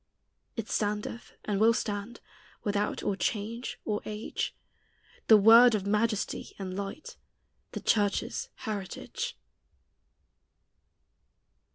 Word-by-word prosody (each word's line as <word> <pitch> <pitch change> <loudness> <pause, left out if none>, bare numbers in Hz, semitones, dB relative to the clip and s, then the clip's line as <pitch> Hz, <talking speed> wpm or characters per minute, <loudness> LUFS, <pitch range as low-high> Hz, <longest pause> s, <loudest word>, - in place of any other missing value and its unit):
It 225 -2 -4
standeth 210 +2 -2
and 205 -2 0
will 225 +2 +5
stand, 210 +1 -3 0.4
Without 205 0 -1
or 200 - 0
change 220 +5 -3
or 210 -1 -1
age, 215 +1 -3 0.7
The 220 - +9
word 225 +3 +8
of 200 -2 -2
majesty 215 +1 0
and 185 -2 -5
light, 200 - -6 0.6
The - - -4
church's 205 -2 +1
heritage. 215 - -5
210 Hz, 95 wpm, -29 LUFS, 200-230 Hz, 0.7 s, The